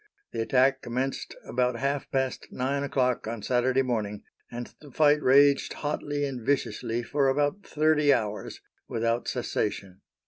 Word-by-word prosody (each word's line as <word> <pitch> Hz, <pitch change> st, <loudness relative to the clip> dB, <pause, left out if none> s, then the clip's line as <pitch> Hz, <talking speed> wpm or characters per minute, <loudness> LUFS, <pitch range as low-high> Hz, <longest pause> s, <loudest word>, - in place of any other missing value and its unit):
The -, -, -2 dB
attack 130 Hz, +3 st, +3 dB
commenced 130 Hz, +3 st, -3 dB
about 125 Hz, -1 st, 0 dB
half 140 Hz, +2 st, -2 dB
past 130 Hz, -1 st, -2 dB
nine 135 Hz, +2 st, -1 dB
o'clock 125 Hz, -4 st, 0 dB
on 115 Hz, -2 st, -5 dB
Saturday 130 Hz, +1 st, +2 dB
morning, 105 Hz, -5 st, -2 dB, 0.3 s
and 120 Hz, 0 st, -7 dB
the 150 Hz, -, -12 dB
fight 150 Hz, +2 st, +3 dB
raged 140 Hz, +1 st, +4 dB
hotly 145 Hz, -1 st, -2 dB
and 130 Hz, -3 st, -4 dB
viciously 120 Hz, -2 st, -1 dB
for 140 Hz, +3 st, +1 dB
about 145 Hz, +7 st, 0 dB
thirty 155 Hz, -2 st, +3 dB
hours 105 Hz, -5 st, -2 dB, 0.3 s
without 115 Hz, +1 st, -1 dB
cessation. 100 Hz, -6 st, -3 dB
130 Hz, 140 wpm, -27 LUFS, 120-140 Hz, 0.3 s, raged